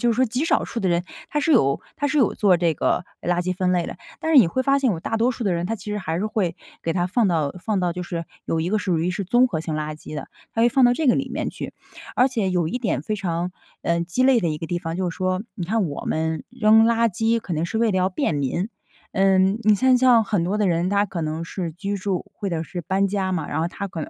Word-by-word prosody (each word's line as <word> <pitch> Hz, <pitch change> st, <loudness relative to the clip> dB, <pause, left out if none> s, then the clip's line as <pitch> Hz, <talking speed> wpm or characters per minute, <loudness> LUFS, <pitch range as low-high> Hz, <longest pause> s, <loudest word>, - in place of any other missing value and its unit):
就 240 Hz, -, +3 dB
是 -, -, -2 dB
说 255 Hz, +3 st, +3 dB
极 250 Hz, +5 st, -1 dB
少 -, -, +2 dB
数 230 Hz, -, -4 dB
的 190 Hz, -, +1 dB
人 175 Hz, 0 st, +2 dB, 0.3 s
他 295 Hz, -, 0 dB
是 320 Hz, -, 0 dB
有 140 Hz, -, +3 dB, 0.2 s
他 290 Hz, -, 0 dB
是 290 Hz, +2 st, +1 dB
有 245 Hz, -, +3 dB
做 195 Hz, -4 st, +4 dB
这 170 Hz, -3 st, +2 dB
个 -, -, 0 dB, 0.2 s
垃 175 Hz, +1 st, +1 dB
圾 185 Hz, +1 st, -1 dB
分 185 Hz, 0 st, +1 dB
类 175 Hz, -2 st, +1 dB
的。 -, -, -7 dB, 0.2 s
但 320 Hz, -, -1 dB
是 295 Hz, -, +8 dB
你 220 Hz, -, +7 dB
会 260 Hz, +9 st, -1 dB
发 275 Hz, +1 st, +3 dB
现 260 Hz, -4 st, +2 dB
有 165 Hz, -, -2 dB
大 225 Hz, -, -2 dB
多 235 Hz, +3 st, +2 dB
数 240 Hz, -, -6 dB
的 195 Hz, -, +1 dB
人， 170 Hz, 0 st, -2 dB
他 225 Hz, -, -1 dB
其 210 Hz, 0 st, -8 dB
实 210 Hz, -, -2 dB
还 165 Hz, -3 st, -2 dB
是 210 Hz, -, -1 dB
会 190 Hz, -6 st, -1 dB, 0.3 s
给 165 Hz, -, 0 dB
它 175 Hz, 0 st, 0 dB
放 220 Hz, +4 st, +2 dB
到 155 Hz, -5 st, 0 dB
放 190 Hz, +2 st, -2 dB
到 175 Hz, -1 st, 0 dB
就 180 Hz, -, -4 dB
是 170 Hz, -1 st, -5 dB, 0.2 s
有 165 Hz, -, -1 dB
一 165 Hz, -, -1 dB
个 215 Hz, -, +2 dB
属 180 Hz, -5 st, 0 dB
于 170 Hz, +3 st, 0 dB
是 195 Hz, +2 st, -3 dB
综 245 Hz, +6 st, +4 dB
合 160 Hz, -8 st, -2 dB
性 160 Hz, -1 st, -4 dB
垃 155 Hz, 0 st, -3 dB
圾 155 Hz, -, -10 dB
的， 150 Hz, -, -6 dB, 0.2 s
他 225 Hz, -, -1 dB
会 240 Hz, -, +6 dB
放 265 Hz, 0 st, +4 dB
到 245 Hz, -, +6 dB
这 310 Hz, +2 st, -1 dB
个 245 Hz, -, +5 dB
里 270 Hz, -2 st, -2 dB
面 -, -, -2 dB
去。 -, -, -7 dB, 0.4 s
而 250 Hz, -, +5 dB
且 220 Hz, -7 st, -1 dB
有 175 Hz, -3 st, +1 dB
一 250 Hz, -, -2 dB
点 215 Hz, -, -1 dB
非 215 Hz, +6 st, -2 dB
常， 175 Hz, -2 st, -2 dB, 0.3 s
呃， 170 Hz, 0 st, +1 dB
鸡 175 Hz, +9 st, -1 dB
肋 260 Hz, -1 st, +5 dB
的 170 Hz, -, 0 dB
一 150 Hz, -, -3 dB
个 165 Hz, -, -5 dB
地 175 Hz, +2 st, -2 dB
方， 165 Hz, -2 st, -4 dB
就 185 Hz, -1 st, -1 dB
是 -, -, -10 dB
说 185 Hz, +1 st, -1 dB
你 180 Hz, -, -4 dB
看 210 Hz, +2 st, 0 dB
我 145 Hz, -, -5 dB
们 160 Hz, 0 st, -1 dB
扔 225 Hz, -2 st, +5 dB
垃 230 Hz, 0 st, +3 dB
圾 225 Hz, +4 st, +1 dB
可 180 Hz, -, -4 dB
能 155 Hz, +1 st, 0 dB
是 195 Hz, +6 st, -2 dB
为 225 Hz, -1 st, +3 dB
了 190 Hz, -, 0 dB
要 185 Hz, +1 st, +2 dB
便 175 Hz, -3 st, -1 dB
民。 145 Hz, -, -1 dB, 0.4 s
嗯， 195 Hz, +2 st, +3 dB
你 215 Hz, 0 st, +5 dB
看 255 Hz, +4 st, +4 dB
像 245 Hz, -3 st, +5 dB
很 200 Hz, -5 st, 0 dB
多 200 Hz, +4 st, -1 dB
的 205 Hz, -3 st, +2 dB
人， 170 Hz, +2 st, +1 dB
他 205 Hz, 0 st, +2 dB
可 175 Hz, -3 st, -4 dB
能 155 Hz, +1 st, -3 dB
是 165 Hz, 0 st, -4 dB
居 200 Hz, +4 st, -3 dB
住 190 Hz, -1 st, -2 dB
或 200 Hz, -, -4 dB
者 165 Hz, -2 st, -1 dB
是 175 Hz, +2 st, -6 dB
搬 195 Hz, +3 st, +1 dB
家 190 Hz, -1 st, -1 dB
嘛， 160 Hz, -5 st, -2 dB
然 -, -, -2 dB
后 -, -, +1 dB
他 200 Hz, +3 st, -5 dB
可 165 Hz, -4 st, -5 dB
能 -, -, -6 dB
190 Hz, 315 characters per minute, -23 LUFS, 170-225 Hz, 0.4 s, 是